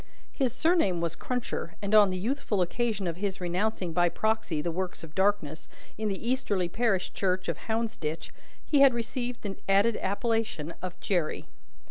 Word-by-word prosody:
His 265 -4 0
surname 320 - +2
was 170 -1 -1
Cruncher, 245 -8 -3
and 200 +1 -3
on 210 -2 +8
the 185 - -2
youthful 215 -2 0
occasion 215 +1 -1
of 170 -1 -2
his 195 0 -2
renouncing 180 0 -1
by 175 +1 +4
proxy 220 -6 0
the 170 +3 -1
works 180 +1 -3
of 160 -1 -10
darkness, 190 -6 0 0.3
in 215 0 -2
the 200 +3 -3
easterly 210 -8 +1
parish 195 -1 0
church 185 -1 0
of - - -2
Hounsditch, 220 -8 -2 0.3
he 290 - +3
had 270 -3 +7
received 240 +1 -3
the 200 -2 -4
added 200 +3 +4
appellation 205 -6 -1
of 180 0 -6
Jerry. 175 -6 -1
200 Hz, 165 wpm, -29 LUFS, 180-230 Hz, 0.3 s, on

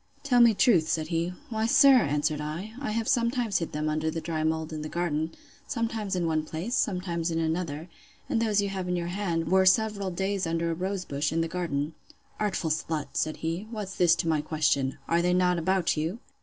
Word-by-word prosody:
Tell 250 -4 +4
me 230 -2 +6
truth, 180 - +4
said 160 -2 -1
he. 170 +1 -1 0.2
Why, 220 0 0
sir, 270 +2 +7
answered 150 -3 0
I, 165 +9 -5
I 280 - -3
have 225 +1 -1
sometimes 235 -4 +1
hid 165 - -4
them 150 +1 -2
under 155 +1 0
the 165 - -3
dry 160 -1 -3
mould 160 0 -1
in 155 - -4
the 155 - -5
garden; 160 -2 -1 0.4
sometimes 225 -5 -2
in 175 -2 0
one 155 -1 +1
place, 165 +9 -5
sometimes 180 -7 0
in 165 - -1
another; 160 -1 -2 0.4
and 225 - 0
those 210 -3 +2
you 200 - -1
have 190 -2 -4
in 180 - +1
your 170 -1 -2
hand, 175 -3 -2
were 190 0 +5
several 200 +1 +2
days 190 0 -1
under 165 0 0
a - - 0
rose 185 +2 -3
bush, 140 +1 -1
in 165 +1 +1
the 165 - 0
garden. 160 -4 -2 0.5
Artful 195 -6 -1
slut! 155 -1 -2
said 155 +3 -1
he, 170 +6 -2
What's 210 -4 -5
this 175 -2 +4
to 170 - -2
my 155 -2 +2
question?—Are 155 +1 0
they 180 +1 +2
not 180 -1 +2
about 185 +1 +1
you? 160 +7 -2
170 Hz, 210 wpm, -27 LUFS, 160-200 Hz, 0.5 s, sir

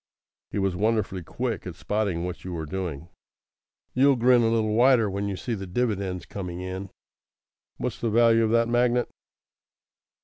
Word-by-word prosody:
(He - - -5
was 95 -2 0
wonderfully 105 -2 0
quick 115 +2 -4
at 90 - -6
spotting 100 -2 -1
what 90 -1 -6
you 90 - -5
were 80 -2 -4
doing.) 85 -2 -5 0.8
"You'll 135 +2 +5
grin 125 0 +5
a 115 - +3
little 110 -2 +1
wider 120 -1 +5
when 100 +1 -2
you 100 - -2
see 120 - -3
the 95 -3 -5
dividends 100 -3 -2
coming 90 -3 -6
in. 95 +1 -5 0.9
What's - - -4
the 115 - 0
value 115 0 +4
of 110 - +1
that 115 +1 +3
magnet?" 120 +1 +2
105 Hz, 165 wpm, -26 LUFS, 90-115 Hz, 0.9 s, You'll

